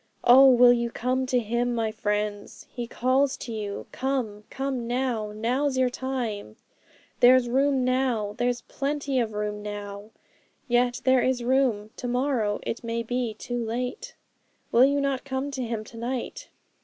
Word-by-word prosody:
'Oh, 265 +2 +8
will 245 -1 +7
you 235 -1 -1
come 255 +3 -1
to 255 - +1
Him, 240 +1 0
my 225 -1 0
friends? 210 -1 -3
He 240 -2 -5
calls 260 +3 +1
to 235 - -7
you 205 -2 -5
"Come! 245 -6 -3
come 265 -3 -3
now!" 240 -4 -1
Now's 255 +6 -1
your 255 -1 +2
time! 240 - -4 0.6
There's 250 0 +6
room 265 +1 +2
now, 255 -5 0
there's 245 0 0
plenty 280 0 -2
of 225 -3 -1
room 210 0 -3
now! 205 0 -7 0.6
Yet 245 +1 +1
there 260 -1 +4
is 255 -1 0
room; 240 -5 +1
to 245 - -4
morrow 245 -4 0
it 230 - -4
may 230 0 -2
be 245 -1 -2
too 245 +2 -4
late! 245 +3 -4 0.6
'Will 245 +3 +6
you 280 +1 +2
not 275 -2 -1
come 270 +1 -3
to 270 -2 -4
Him 230 -3 -3
to 230 +2 -13
night? 245 +2 -4
245 Hz, 160 wpm, -26 LUFS, 220-260 Hz, 0.6 s, Oh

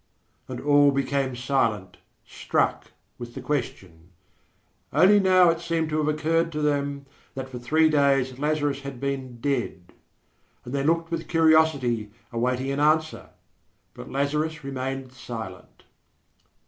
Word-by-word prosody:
And - - -6
all 145 0 +5
became 135 -1 -1
silent, 115 -6 -1 0.3
struck - - -1 0.3
with 120 -1 -8
the - - -5
question. 95 - -4 0.8
Only 205 +3 +5
now 185 -3 +5
it 165 - -3
seemed 165 -2 -2
to 155 - 0
have 150 - 0
occurred 160 +2 +1
to 150 - -2
them 140 -1 -1 0.3
that 135 0 -5
for 125 -2 -8
three 155 +6 +3
days 135 -4 +2
Lazarus 145 -2 0
had 140 -2 -8
been 135 -3 -4
dead; 120 -10 -3 0.7
and 125 - -7
they 140 -1 0
looked 165 +2 0
with 165 -1 -3
curiosity, 155 -9 +3 0.2
awaiting 125 +3 -1
an 140 - -2
answer. 155 +1 +1 0.6
But - - -10
Lazarus 150 +3 -1
remained 135 -1 -4
silent. 115 -7 -9
140 Hz, 135 wpm, -25 LUFS, 125-155 Hz, 0.8 s, all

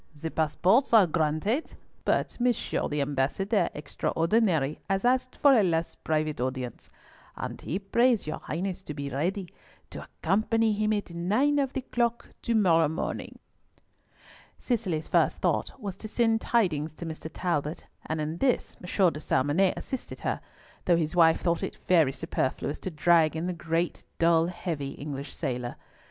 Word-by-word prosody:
The 160 +1 -4
passports 180 - +2
are 210 -4 +8
granted, 165 - 0 0.3
but - - +1
Monsieur 245 -1 0
the 150 0 -1
Ambassador 145 - 0
Extraordinary 165 0 0
has 195 +3 0
asked 255 +1 +2
for 285 -2 +5
a 235 - +6
last 170 -3 -1
private 155 -3 0
audience, 130 -2 -4 0.5
and - - -5
he 180 - -2
prays 230 +4 +2
your 155 - -4
Highness 185 +3 -4
to 150 -6 -7
be 140 -1 -4
ready 180 +7 -1 0.4
to - - -7
accompany 220 +2 +1
him 215 +1 0
at 205 -5 -2
nine 215 +13 +2
of 275 -2 0
the 265 - -2
clock 235 -2 -1
to 235 - 0
morrow 165 -7 +4
morning." 160 +3 -4 1.2
Cicely's 190 - -1
first - - +2
thought - - -1
was 200 -5 -5
to 215 - -7
send 225 0 +1
tidings 160 -10 +1
to 170 - -7
Mr. 160 0 -6
Talbot, 155 -3 -2 0.2
and 160 0 -2
in 155 +2 -3
this 255 +5 0
M. 180 0 +2
de 150 - -6
Salmonnet 155 +6 +2
assisted 265 - -6
her, - - -2 0.4
though 175 -2 +4
his 160 0 -1
wife 165 -2 +5
thought 170 -2 +1
it - - -4
very 165 -7 +5
superfluous 130 +2 -2
to - - -4
drag 165 -1 +3
in 160 +2 -2
the 180 - -1
great, 165 0 -2
dull, 165 0 +4
heavy, 165 -6 -4
English 140 -1 -6
sailor. 125 -1 -3
170 Hz, 160 wpm, -28 LUFS, 155-215 Hz, 1.2 s, are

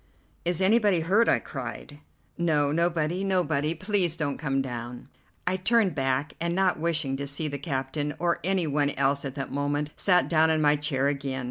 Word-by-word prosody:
"Is 175 +1 +1
anybody 205 -3 +3
hurt?" 200 +8 +3
I - - +4
cried. 135 +2 -7 0.4
"No, 150 -4 +1
nobody, 170 +2 0
nobody. 170 -5 0
Please 185 -2 +1
don't 145 -4 -3
come 135 -3 -1
down." 120 -1 -6 0.4
I 180 +1 0
turned 205 -1 +2
back, 135 +2 -1
and 170 0 0
not 185 -3 +1
wishing 160 -4 0
to 140 0 -4
see 145 +3 -2
the 140 -1 -4
captain 145 +1 -3
or 170 0 0
any 190 -1 +1
one 145 -1 +1
else 140 0 0
at 135 0 -5
that 135 - -5
moment, 145 +1 -1
sat 180 -2 +3
down 160 -1 +3
in 160 -1 +2
my 150 -1 +4
chair 145 -2 0
again. 135 -2 -2
150 Hz, 185 wpm, -26 LUFS, 140-175 Hz, 0.4 s, I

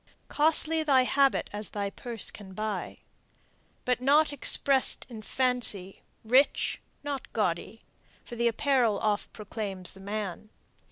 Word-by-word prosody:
Costly 315 +1 +4
thy 275 -4 +3
habit 275 +1 +2
as 205 0 -4
thy 200 -1 -4
purse 235 0 -3
can 190 -2 -12
buy. 215 -3 -4 0.9
But 250 -1 0
not 290 +3 +3
express'd 275 -1 +4
in 225 -3 -9
fancy; 230 -6 -1 0.2
rich, 260 +5 +2 0.2
not 285 -2 -5
gaudy; 205 +1 -2 0.4
For 240 - -10
the 235 0 +1
apparel 235 -3 +1
oft 210 -1 -1
proclaims 200 -3 -6
the 195 - -14
man. 205 0 -5
230 Hz, 125 wpm, -28 LUFS, 205-270 Hz, 0.9 s, Costly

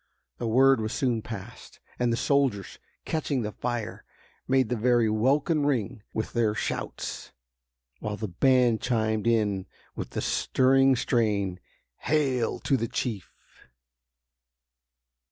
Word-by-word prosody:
The 120 - -2
word 130 +2 +4
was 110 0 -3
soon 120 -4 0
passed, 110 +2 -9 0.2
and 120 -1 +2
the 115 - 0
soldiers, 135 -10 0 0.3
catching 145 -5 -1
the 105 - -3
fire, 120 0 -4 0.4
made 130 -3 +2
the 125 - 0
very 120 0 +3
welkin 140 +8 +2
ring 125 -5 -1
with 110 - -4
their 110 -3 +1
shouts, - - -4 0.7
while 105 -1 -4
the 110 - -3
band 125 +4 +3
chimed 110 -2 0
in 105 -5 +1 0.3
with - - -5
the - - 0
stirring 135 +1 +3
strain: 105 -7 0 0.4
"Hail 135 -6 0
to 135 - +1
the 115 - -2
Chief!" 110 -4 -4
120 Hz, 125 wpm, -27 LUFS, 110-130 Hz, 0.7 s, word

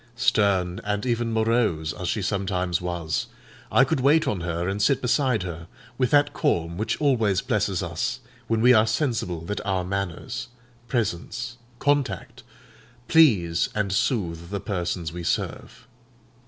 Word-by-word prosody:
Stern 100 -6 +2
and 105 +1 -2
even 120 -1 0
morose 110 -9 +1
as - - -5
she - - -1
sometimes 90 -3 -1
was, 85 -3 -2 0.4
I 135 - +6
could 135 - 0
wait 145 +5 +4
on 95 -4 -1
her 85 0 -2
and 100 +2 -2
sit 135 +6 +3
beside 125 -4 +1
her 85 -2 -6 0.3
with 125 -2 +2
that 145 0 +3
calm 85 0 0
which 110 +5 -2
always 115 -10 +2
blesses - - 0
us - - -2 0.3
when 115 -1 +1
we 125 +2 +7
are 110 -1 +5
sensible 110 - -1
that 100 +5 -4
our 95 -2 0
manners, 100 +6 -4 0.4
presence, 120 +2 -2 0.2
contact, 135 -3 -1 0.7
please 95 - +4
and 100 -3 0
soothe 85 -7 -1
the 100 0 -3
persons 90 -4 -3
we 90 - -5
serve. 115 +6 -3
105 Hz, 145 wpm, -25 LUFS, 90-120 Hz, 0.7 s, we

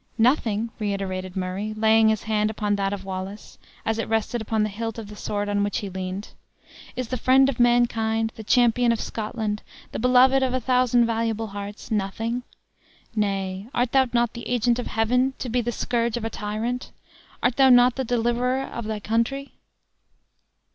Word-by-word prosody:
"Nothing!" 230 -2 +2
reiterated 190 -3 -3
Murray, 190 +3 -3
laying 220 0 +5
his 220 -2 0
hand 215 -1 +1
upon 210 -1 -1
that 195 -1 -1
of 195 -1 -5
Wallace, 190 +2 -7 0.3
as 225 0 0
it - - -2
rested 225 +2 0
upon 220 0 0
the 215 - 0
hilt 225 +2 -4
of 220 -3 -7
the 210 - -9
sword 205 0 -3
on 205 0 +1
which 205 - -1
he 200 -2 -4
leaned. 185 +2 -5 0.7
"Is 250 -3 -4
the 255 - -1
friend 265 +2 +5
of 250 - -4
mankind, 225 -2 +2
the 220 - -8
champion 240 +1 +3
of 230 - 0
Scotland, 215 -1 -3 0.3
the - - -4
beloved 255 +2 +5
of 255 -1 +1
a - - +1
thousand 250 -1 +3
valuable 225 -1 -1
hearts, 205 +2 -8
nothing? 225 +4 -1 0.7
Nay, 195 -1 -2
art 245 0 +1
thou 265 -1 +4
not 240 -1 +1
the 235 - -7
agent 245 0 +2
of 245 - -3
Heaven, 250 +4 +1
to 255 - -5
be 245 +2 +1
the 240 +1 -2
scourge 235 -1 -1
of 230 - -4
a 225 - -3
tyrant? 225 +4 -3 0.5
Art 245 0 +2
thou 270 -1 +6
not 245 0 +6
the 265 - -1
deliverer 245 +2 0
of 235 -4 -6
thy 215 -1 -3
country?" 230 +6 -1
225 Hz, 180 wpm, -24 LUFS, 210-245 Hz, 0.7 s, thou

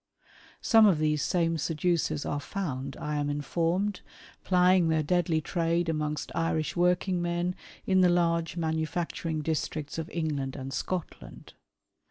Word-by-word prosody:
Some 225 -2 +6
of 185 -6 +4
these 150 -1 +1
same 165 -1 +1
seducers 165 -1 0
are 145 - -2
found, 140 -4 -4
I 150 0 -3
am 145 0 -1
informed, 170 +7 -1 0.4
plying 180 -1 +4
their 160 -1 +2
deadly 170 0 +1
trade 170 +1 0
amongst 150 -1 -2
Irish 160 -1 -1
working 180 +1 +2
men 175 +1 -1 0.3
in 190 -1 +3
the 180 - +5
large 170 -1 +1
manufacturing 160 0 -2
districts 155 -1 -3
of 160 - -5
England 145 -5 -2
and 135 -1 -6
Scotland. 160 - -5
165 Hz, 135 wpm, -28 LUFS, 150-175 Hz, 0.4 s, Some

